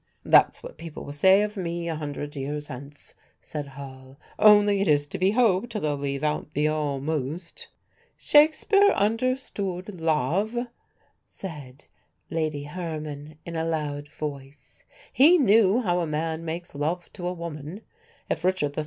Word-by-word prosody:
"That's - - +5
what - - -10
people 165 -2 -8
will 145 - -7
say 190 +7 +5
of 210 +1 -4
me 170 -3 -3
a 165 - -1
hundred 145 -1 -5
years 145 +2 -4
hence," 140 +2 -9 0.3
said 150 -2 -6
Hall; 130 0 -11 0.2
"only 205 -1 +6
it 200 - +1
is 145 -1 +3
to 145 - -7
be 185 +1 +3
hoped 230 0 +2
they'll 150 -5 -1
leave 140 0 -3
out 150 0 -2
the 150 +1 +2
'almost.'" 150 +2 -3 0.5
"Shakespeare 315 +7 +5
understood 205 -5 -2
love," 165 - 0 0.7
said 145 -8 -10 0.5
Lady 155 -3 -1
Herman, 155 -2 -6
in 170 - -6
a 160 - -1
loud 150 -3 -3
voice; 145 - -8 0.3
"he 315 +7 +7
knew 220 - +4
how 175 -3 +1
a 170 - -1
man 160 +2 -2
makes 165 +2 -5
love 160 +5 -3
to 175 -3 -5
a 180 - -1
woman. 165 +2 -7 0.5
If - - -2
Richard 180 -6 0
III. - - -2
160 Hz, 150 wpm, -26 LUFS, 145-195 Hz, 0.7 s, he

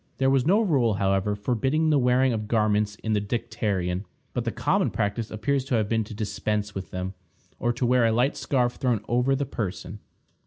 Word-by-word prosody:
There 135 0 +3
was 135 0 +2
no 200 +5 +5
rule, 135 - +2
however, 100 +1 +1
forbidding 130 +9 +1
the 145 - +4
wearing 125 0 +3
of 105 -1 -3
garments 105 -2 +1
in 110 - 0
the 105 - +1
dicterion, 100 -4 -2 0.3
but 120 -1 -2
the 115 - 0
common 180 - +1
practice 110 +1 -2
appears 135 +6 -1
to 130 - 0
have 110 -2 +1
been 115 0 +1
to 105 - -9
dispense 105 0 -2
with 95 -1 -6
them, 90 +1 -4 0.5
or 120 - +1
to 125 - -1
wear 125 -1 +4
a - - +2
light 125 +5 +2
scarf 125 -3 0
thrown 120 -5 0
over 125 +3 +2
the 140 +1 -1
person. 105 -4 -5
115 Hz, 200 wpm, -26 LUFS, 105-130 Hz, 0.5 s, no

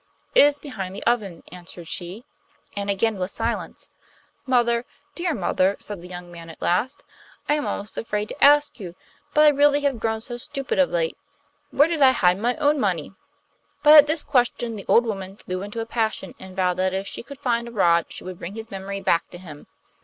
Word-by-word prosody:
'It - - +7
is 290 0 +2
behind 195 -11 -7
the - - -7
oven,' 210 -8 -1
answered 175 -1 -10
she. 180 +8 -5 0.5
And 200 0 -3
again 200 +1 0
was 185 +2 -3
silence. 230 +1 -4 0.6
'Mother, 235 -2 +2 0.3
dear 345 -3 -2
mother,' 190 0 +1
said 205 -4 -7
the 180 - -10
young 180 -1 -9
man 170 -1 -11
at 165 - -12
last, 240 +11 -1 0.4
'I 295 - +3
am 300 -1 -1
almost 205 +2 -4
afraid 210 -2 -2
to - - -3
ask 290 -1 +5
you; 175 -4 -8 0.4
but 300 - +6
I - - +9
really 290 0 +4
have 280 -4 0
grown 220 0 -1
so 240 +2 -7
stupid 275 +3 -4
of 280 - +4
late. 165 -1 -1 0.5
Where 290 - +4
did 330 -3 -2
I 260 -1 +7
hide 180 -5 +2
my 240 +3 0
own 295 -1 +2
money?' 185 - -1 0.7
But 300 0 +8
at 295 -1 +9
this 310 0 +1
question 240 -3 0
the 200 - -8
old 240 - +5
woman 195 -3 -5
flew 185 -2 -5
into 210 +3 -5
a - - -4
passion, 220 -4 -2
and 190 0 -11
vowed 180 -2 +1
that 185 0 0
if 195 +1 -3
she - - -4
could 280 +3 -11
find 235 -3 -1
a - - -8
rod 170 -6 +3
she - - -7
would 185 -1 -8
bring 185 +5 -7
his 225 0 -8
memory 195 0 -5
back 170 - +1
to - - -10
him. 155 -5 -12
215 Hz, 215 wpm, -23 LUFS, 185-260 Hz, 0.7 s, I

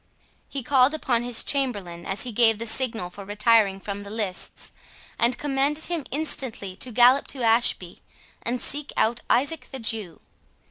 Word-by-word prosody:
He 275 -2 -5
called 265 +3 +4
upon 245 -6 0
his 240 -1 +2
chamberlain 205 -12 -2
as 195 - +1
he 245 - -5
gave 225 -1 +4
the 230 - -5
signal 225 -5 0
for 200 +2 -10
retiring 210 -1 +3
from 200 0 -6
the 200 0 -9
lists, 205 -4 -4 0.5
and 235 +1 +2
commanded 290 +2 0
him 335 -5 -1
instantly 255 -9 -3
to 250 - -4
gallop 250 +4 +5
to 260 -3 -5
Ashby, 225 -6 +2 0.4
and 245 +2 -2
seek 290 0 -3
out 235 +2 +1
Isaac 280 +2 +1
the 265 - -6
Jew. 220 -7 -2
235 Hz, 165 wpm, -24 LUFS, 205-265 Hz, 0.5 s, gallop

